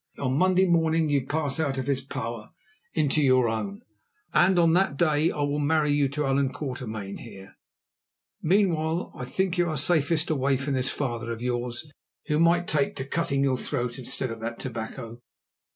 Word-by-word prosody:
On 130 -1 -1
Monday 185 +4 +4
morning 165 -2 +2
you 140 -3 +1
pass 150 -1 0
out 140 -4 0
of 130 - -2
his 140 -1 0
power 115 -4 -6 0.5
into 155 -2 +2
your 130 -3 +4
own, 105 -3 -3 0.5
and 185 +1 +4
on 165 -2 +5
that 180 -5 +2
day 155 0 +3
I 150 - -3
will 145 +1 0
marry 150 0 +2
you 145 -1 +2
to 150 +2 -2
Allan 135 0 +1
Quatermain 110 -9 -5
here. 95 0 -11 0.9
Meanwhile, 170 -2 +1
I 125 - -6
think 185 +6 -1
you 175 -1 +2
are 155 - -2
safest 155 +2 +2
away 135 -2 +1
from 140 +2 -2
this 130 -1 +1
father 120 -5 -3
of 115 +1 -5
yours, 120 +2 -2 0.4
who 150 -1 0
might 170 +1 +4
take 145 -4 0
to 135 -2 -4
cutting 140 -2 0
your 130 -2 +1
throat 125 -3 -3
instead 130 0 -2
of 115 - -6
that 115 +1 -4
tobacco. 115 -1 -6
140 Hz, 180 wpm, -26 LUFS, 125-160 Hz, 0.9 s, on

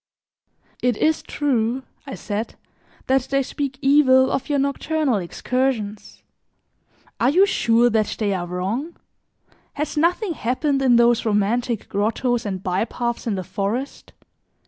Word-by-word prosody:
"It 245 -3 +1
is 315 0 +1
true," 255 -3 -1 0.2
I 270 - -5
said, 210 +1 -4 0.5
"that 265 +1 +3
they 275 0 +1
speak 275 0 -4
evil 260 -2 +5
of 270 - -2
your 290 - +1
nocturnal 280 -1 0
excursions. 215 +2 -3 1.0
Are 240 - +3
you 365 +7 +5
sure 235 -10 +3
that 220 -1 0
they 205 -3 0
are 175 -2 -3
wrong? 200 - -3 0.8
Has 300 +1 -4
nothing 350 +4 +1
happened 275 +2 -1
in 255 -3 +4
those 235 0 +4
romantic 220 +2 0
grottoes 230 +3 -1
and 190 -2 -4
by 185 +2 0
paths 235 0 -4
in 215 - 0
the 185 - -3
forest? 205 +9 -4
245 Hz, 135 wpm, -22 LUFS, 215-275 Hz, 1.0 s, evil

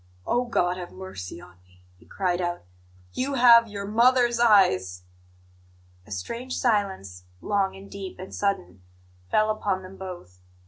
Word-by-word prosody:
"Oh, 245 +1 +1
God 180 -6 0
have 180 -1 -7
mercy 140 - -8
on 90 +1 -16
me!" 90 0 -26
he 90 - -23
cried 180 -2 -1
out. 175 0 -3 0.5
"YOU 275 +2 -2
HAVE 235 -2 +7
YOUR 200 -2 -6
MOTHER'S 240 +2 +3
EYES!" 95 - +3 1.0
A - - -15
strange 235 - -5
silence, 190 - -1
long 195 - 0
and 195 +1 -12
deep 195 -2 -8
and 185 +1 -9
sudden, 95 - -2 0.5
fell 215 0 +3
upon 200 -3 -2
them 190 +1 -11
both. 175 - -9
190 Hz, 145 wpm, -25 LUFS, -, 1.0 s, HAVE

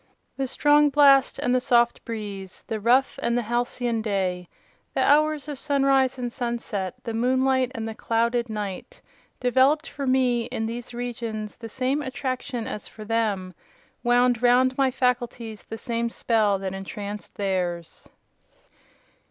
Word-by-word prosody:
The 270 -1 -2
strong 295 +3 +4
blast 275 -2 +5
and 245 - 0
the 255 - +3
soft 240 -1 +3
breeze; 205 -4 -6
the 220 - -3
rough 245 +5 +2
and 235 +1 +1
the 245 - 0
halcyon 240 0 -1
day; 185 -4 -2 0.5
the - - +2
hours 305 0 +3
of 290 -3 -5
sunrise 270 -2 +2
and 245 -2 -4
sunset; 235 -7 -3
the 230 - -4
moonlight 260 +2 +2
and 225 -1 -3
the 225 - -4
clouded 235 +2 0
night, 205 -3 -5 0.4
developed 265 +5 +3
for 280 -2 -5
me, 250 -2 +2
in 225 -1 -3
these 235 +2 -5
regions, 235 -3 -5
the 225 -1 -8
same 265 +5 -1
attraction 255 -3 -3
as 210 - -5
for 215 - -11
them—wound 225 +3 -1
round 250 +1 +4
my 270 -1 +3
faculties 245 -3 -2
the 225 - -7
same 235 0 -2
spell 215 -4 +1
that 190 -1 -4
entranced 200 +2 -7
theirs. 180 -4 -3
240 Hz, 145 wpm, -25 LUFS, 215-260 Hz, 0.5 s, blast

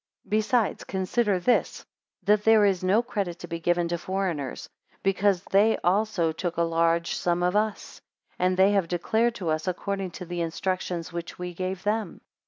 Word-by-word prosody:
30 - - -26
Besides, 220 +1 +1
consider 195 +1 0
this, 245 +8 +1 0.4
that 210 0 +3
there 220 -1 +6
is 190 -3 +1
no 200 +6 +3
credit 200 -8 -3
to 175 - -9
be 170 0 -4
given 175 0 +1
to 170 0 -2
foreigners, 180 -7 -3 0.4
because 195 -1 +2
they 210 +3 +4
also 190 -3 +2
took 170 +1 -4
a 170 - +3
large 165 0 +1
sum 175 0 0
of 180 +2 +1
us, 215 0 -2 0.4
and 185 0 +2
they 190 +2 +5
have 195 -4 +2
declared 220 +7 +1
to 175 -7 -3
us 155 +3 -1
according 195 +1 -2
to 180 - -8
the 175 0 -4
instructions 175 0 -3
which 170 0 -6
we 180 0 -5
gave 185 +1 -4
them. 210 -3 -2
185 Hz, 180 wpm, -26 LUFS, 170-205 Hz, 0.4 s, there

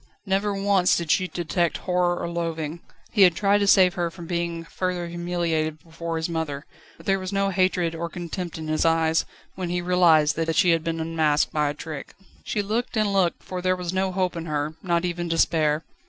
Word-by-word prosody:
Never 200 +1 0
once 195 -2 +3
did 170 -3 -1
she 185 - +2
detect 170 -1 -1
horror 180 -1 0
or - - -3
loathing. 165 -2 -3 0.3
He 210 - +2
had 180 -3 +7
tried 200 +2 +3
to 200 - +1
save 185 -2 +6
her 175 -1 -1
from 170 0 -10
being 170 -1 -2
further 180 0 -3
humiliated 170 -3 -2
before 165 0 -5
his 160 - -1
mother, 160 -4 -3 0.3
but 165 - -16
there 195 0 +2
was 185 0 -5
no 195 0 +1
hatred 185 -3 +1
or 170 +1 -4
contempt 175 0 -5
in 160 -1 -6
his 155 0 +1
eyes, 165 0 +2 0.3
when 185 -2 -4
he 175 0 0
realised 170 -4 +4
that 165 0 0
she 175 - +4
had 165 -1 +2
been 165 0 -2
unmasked 160 -2 +1
by 150 -1 +1
a 145 - -4
trick. 155 -2 -8 0.3
She 205 - -1
looked 225 +3 -2
and 210 -2 +1
looked, 185 -3 +1
for 185 -1 -5
there 185 0 +2
was 180 -1 -4
no 190 0 0
hope 185 -1 -1
in 165 0 -5
her, 150 0 -2
not 170 -1 0
even 175 -1 -2
despair. 160 -2 +2
170 Hz, 210 wpm, -24 LUFS, 160-185 Hz, 0.3 s, had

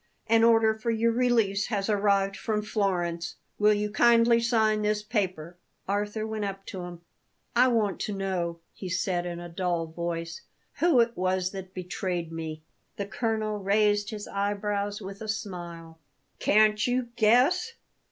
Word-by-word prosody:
An 225 0 +4
order 225 -1 +5
for 220 +2 -4
your 230 0 +2
release 230 -5 +2
has 200 -3 -1
arrived 200 -2 +2
from 210 0 -2
Florence. 175 -5 -1 0.2
Will 210 0 +5
you 210 0 -2
kindly 235 +1 +5
sign 220 -2 +2
this 210 0 0
paper?" 185 -6 -2 0.3
Arthur 205 +2 -1
went 220 -1 -3
up 195 -1 -5
to 190 - -6
him. 175 -1 -9 0.5
"I 250 +2 +6
want 220 -5 +1
to 210 - -3
know," 180 -4 -2
he 185 - -7
said 180 -1 -1
in 175 -1 -5
a 175 - -7
dull 175 -1 -1
voice, 165 0 -4 0.4
"who 325 -8 +5
it 235 0 0
was 185 0 0
that 190 -1 -8
betrayed 180 -2 -3
me." 160 -1 -6 0.3
The 200 - -3
colonel 215 +1 -2
raised 205 +1 +2
his 210 -2 -6
eyebrows 205 +1 -2
with 195 +2 -8
a 220 - -5
smile. 175 -6 -6 0.4
"Can't 215 +1 +4
you 245 -1 0
guess? 265 - +3
205 Hz, 155 wpm, -27 LUFS, 185-220 Hz, 0.5 s, I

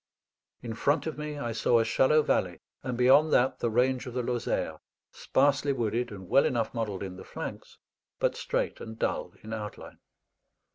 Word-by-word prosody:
In 115 -2 -4
front 145 +6 +1
of 160 - -3
me 150 0 -4
I 120 -5 -3
saw 115 +1 +2
a 115 - +2
shallow 150 +6 +4
valley, - - 0 0.2
and 125 -2 -3
beyond 135 +5 +5
that 130 +2 +3
the 120 - 0
range 125 +3 +1
of 125 - -7
the 125 - 0
Lozère, 120 0 -2 0.3
sparsely 140 +1 +2
wooded 120 -1 -1
and 95 -4 -9
well 135 - +4
enough 115 -3 -1
modeled 105 -5 -3
in 95 -1 -6
the - - -9
flanks, - - -7 0.4
but - - +1
straight - - -2
and 110 0 -8
dull - - -2
in 110 +1 -6
outline. 105 -1 -7
120 Hz, 180 wpm, -29 LUFS, 110-135 Hz, 0.4 s, beyond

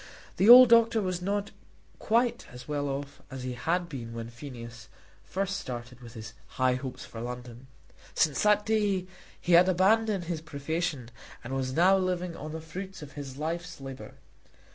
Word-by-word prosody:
The 200 - +4
old 250 0 +11
doctor 230 -1 +5
was 185 -3 -2
not 200 +2 -2 0.5
quite 235 +2 +1
as 125 0 -11
well 145 -1 -2
off 140 +1 -5
as 130 -2 -7
he 125 0 -3
had 170 +8 -1
been 120 -7 -7
when 115 0 -6
Phineas 120 -3 -10 0.4
first 195 0 -2
started 125 0 -7
with 120 0 -12
his 110 -1 -8 0.2
high 130 -1 +3
hopes 130 0 -6
for 115 -3 -9
London. 125 +1 -7 0.5
Since 150 -4 +2
that 210 0 +3
day 205 -4 +1 0.3
he 180 - -3
had 175 +2 +7
abandoned 200 +2 +3
his 170 -2 -4
profession 145 -3 -3 0.3
and 125 +2 -6
was 130 -1 -2
now 185 +6 +5
living 180 -2 -2
on 155 -1 -7
the 160 +1 -6
fruits 185 +2 -8
of 145 - -10
his 140 -3 -8
life's 170 +2 -4
labour. 135 -1 -9
155 Hz, 170 wpm, -28 LUFS, 130-185 Hz, 0.5 s, old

